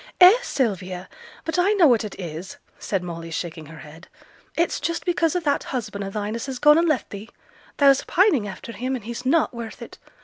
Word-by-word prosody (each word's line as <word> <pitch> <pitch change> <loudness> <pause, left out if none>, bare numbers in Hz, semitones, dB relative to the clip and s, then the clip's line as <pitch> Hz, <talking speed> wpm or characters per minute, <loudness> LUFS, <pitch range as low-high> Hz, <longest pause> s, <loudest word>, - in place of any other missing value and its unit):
'Eh! 365 +1 +10
Sylvia! 190 - -2 0.4
but 325 +3 -1
I 390 +4 +3
know 385 -5 +5
what 240 -6 +4
it 210 -2 -8
is,' 170 0 -7 0.2
said 195 -3 -2
Molly, 165 -1 -6
shaking 160 -1 -5
her 160 +1 -11
head. 160 +4 -13 0.5
'It's 340 +1 +1
just 335 0 -3
because 340 -1 +1
o' - - +2
that 285 -3 0
husband 215 -5 -4
o' 195 - -4
thine 210 +1 -3
as 230 +3 -4
has 265 -2 -4
gone 300 +4 +6
and 340 - +2
left 300 -5 -1
thee; 205 +3 -8 0.5
thou's 275 -1 +5
pining 335 - +3
after 195 +4 -8
him, 255 +3 -3
and 235 -5 -7
he's 235 +2 -5
not 305 0 +2
worth 235 -2 -7
it. - - -11
235 Hz, 210 wpm, -23 LUFS, 190-305 Hz, 0.5 s, Eh